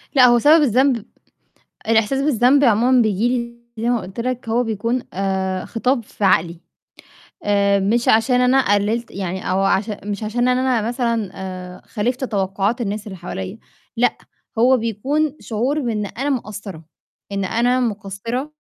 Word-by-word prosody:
لأ، 255 Hz, -, +7 dB
هو 240 Hz, -1 st, +5 dB
سبب 310 Hz, +5 st, +6 dB
الذنب 255 Hz, -2 st, +2 dB, 0.8 s
الإحساس 225 Hz, +4 st, +2 dB
بالذنب 275 Hz, 0 st, +3 dB
عمومًا 245 Hz, +1 st, +4 dB
بييجي 215 Hz, +1 st, +1 dB
لي 235 Hz, -1 st, -8 dB
زي 235 Hz, -, +1 dB
ما 240 Hz, -4 st, +1 dB
قُلت 190 Hz, +4 st, -9 dB
لك، 250 Hz, -1 st, -3 dB
هو 235 Hz, +2 st, +2 dB
بيكون، 230 Hz, +2 st, -2 dB
آآ 190 Hz, -1 st, -2 dB
خطاب 245 Hz, +1 st, 0 dB
في 205 Hz, -, -8 dB
عقلي. 170 Hz, -2 st, +2 dB, 0.9 s
آآ، 200 Hz, -1 st, +2 dB
مش 225 Hz, +5 st, +1 dB
عشان 245 Hz, +3 st, +4 dB
أنا 250 Hz, -4 st, +3 dB
قللت 215 Hz, +4 st, -1 dB
يعني 185 Hz, -1 st, -4 dB
أو 190 Hz, +1 st, +1 dB
عش 195 Hz, +2 st, +1 dB
مش 205 Hz, 0 st, -4 dB
عشان 240 Hz, +4 st, 0 dB
إن 250 Hz, -, +2 dB
أنا 255 Hz, -3 st, +1 dB
مثلًا، 235 Hz, -4 st, -1 dB
آآ، 185 Hz, -1 st, -8 dB
خالِفت 245 Hz, +5 st, -2 dB
توقعات 200 Hz, +1 st, -1 dB
الناس 210 Hz, -1 st, -3 dB
اللي 190 Hz, -, -7 dB
حواليّا، 190 Hz, +3 st, -6 dB, 0.4 s
لأ، 245 Hz, +2 st, +2 dB, 0.4 s
هو 255 Hz, +3 st, +5 dB
بيكون 270 Hz, +7 st, -1 dB
شعور 250 Hz, +7 st, -1 dB
بإن 220 Hz, -6 st, -2 dB
أنا 270 Hz, +8 st, -3 dB
مقصرة، 205 Hz, -, -5 dB, 0.5 s
إن 200 Hz, -1 st, -1 dB
أنا 245 Hz, +5 st, +1 dB
مُقصِرة 230 Hz, +5 st, -3 dB
225 Hz, 155 wpm, -20 LUFS, 200-250 Hz, 0.9 s, لأ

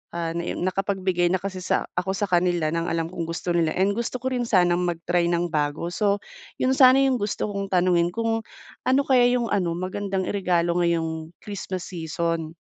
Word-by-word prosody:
ah, 165 Hz, -1 st, -2 dB
na 170 Hz, -, -1 dB
em -, -, -4 dB
nakapagbigay 185 Hz, -1 st, 0 dB
na 185 Hz, -, +1 dB
kasi 190 Hz, -2 st, -5 dB
sa -, -, 0 dB
ako 190 Hz, -, -1 dB
sa 205 Hz, +1 st, -1 dB
kanila 175 Hz, -2 st, +2 dB
ng 165 Hz, 0 st, -1 dB
alam 165 Hz, -1 st, -1 dB
kong 170 Hz, -2 st, -4 dB
gusto 170 Hz, +1 st, -3 dB
nila 165 Hz, -2 st, +2 dB
and 195 Hz, +2 st, +2 dB
gusto 235 Hz, +2 st, -3 dB
ko 260 Hz, -, -3 dB
rin 245 Hz, -1 st, 0 dB
sanang 175 Hz, -4 st, +3 dB
mag-try 175 Hz, 0 st, 0 dB
ng 170 Hz, 0 st, 0 dB
bago. 150 Hz, +1 st, -1 dB
So, 205 Hz, +1 st, +1 dB, 0.4 s
yun 255 Hz, -, +3 dB
sana 260 Hz, 0 st, +7 dB
yung 265 Hz, -2 st, +2 dB
gusto 205 Hz, +1 st, -2 dB
kong 200 Hz, -1 st, -3 dB
tanungin 175 Hz, -1 st, +3 dB
kung 225 Hz, 0 st, -1 dB, 0.4 s
ano 260 Hz, +2 st, +4 dB
kaya 255 Hz, -3 st, +4 dB
yung 245 Hz, -1 st, +1 dB
ano 175 Hz, -4 st, 0 dB
magandang 190 Hz, +2 st, -2 dB
iregalo 175 Hz, -3 st, +1 dB
ngayong 165 Hz, -1 st, -1 dB
Christmas 190 Hz, -3 st, -5 dB
season? 165 Hz, -1 st, -3 dB
180 Hz, 190 wpm, -24 LUFS, 170-200 Hz, 0.4 s, sana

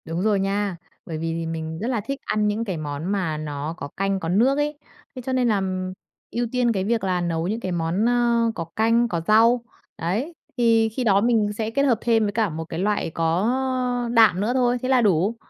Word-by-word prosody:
Đúng 165 Hz, +2 st, -3 dB
rồi 210 Hz, -2 st, +2 dB
nha, 195 Hz, -1 st, -1 dB, 0.3 s
bởi 160 Hz, -, -5 dB
vì 165 Hz, +1 st, -2 dB
thì 165 Hz, 0 st, -3 dB
mình 160 Hz, 0 st, -4 dB
rất 225 Hz, -, -3 dB
là 245 Hz, -4 st, 0 dB
thích 275 Hz, +6 st, -5 dB
ăn 210 Hz, 0 st, +1 dB
những 215 Hz, +2 st, -1 dB
cái 190 Hz, -5 st, -3 dB
món 145 Hz, 0 st, -5 dB
mà 180 Hz, -6 st, -1 dB
nó 150 Hz, 0 st, -4 dB
có -, -, -5 dB
canh 195 Hz, 0 st, 0 dB
có 165 Hz, -, -4 dB
nước 240 Hz, +10 st, +3 dB
ấy. 295 Hz, 0 st, -1 dB, 0.4 s
Thế 255 Hz, -, -6 dB
cho 260 Hz, -, -2 dB
nên 255 Hz, -1 st, +2 dB
làm 185 Hz, -3 st, -1 dB, 0.4 s
ưu 240 Hz, 0 st, -1 dB
tiên 250 Hz, -2 st, +2 dB
cái 195 Hz, -4 st, -1 dB
việc 225 Hz, +2 st, 0 dB
là 185 Hz, -2 st, 0 dB
nấu 165 Hz, -1 st, -1 dB
những 220 Hz, +4 st, -2 dB
cái 190 Hz, -5 st, -4 dB
món, 170 Hz, +4 st, 0 dB
ơ, 235 Hz, -1 st, +2 dB
có 165 Hz, -, -4 dB
canh, 230 Hz, +2 st, +3 dB
có 170 Hz, -6 st, -2 dB
rau, 230 Hz, +3 st, +5 dB, 0.3 s
đấy, 215 Hz, -, -2 dB, 0.2 s
thì 225 Hz, -2 st, +3 dB
khi 250 Hz, +4 st, -3 dB
đó 200 Hz, -3 st, +4 dB
mình 220 Hz, -2 st, +2 dB
sẽ 220 Hz, -1 st, -1 dB
kết 275 Hz, +4 st, +1 dB
hợp 255 Hz, -5 st, +3 dB
thêm 225 Hz, -2 st, +2 dB
với 205 Hz, -, 0 dB
cả 220 Hz, -1 st, +1 dB
một 160 Hz, 0 st, -5 dB
cái 165 Hz, 0 st, -6 dB
loại 205 Hz, -2 st, 0 dB
có 165 Hz, +6 st, 0 dB, 0.6 s
đạm 220 Hz, -6 st, +5 dB
nữa 215 Hz, +4 st, 0 dB
thôi, 250 Hz, -1 st, +2 dB
thế 255 Hz, -, -2 dB
là 260 Hz, -2 st, +4 dB
đủ. 200 Hz, +1 st, +2 dB
210 Hz, 230 wpm, -23 LUFS, 175-235 Hz, 0.6 s, rau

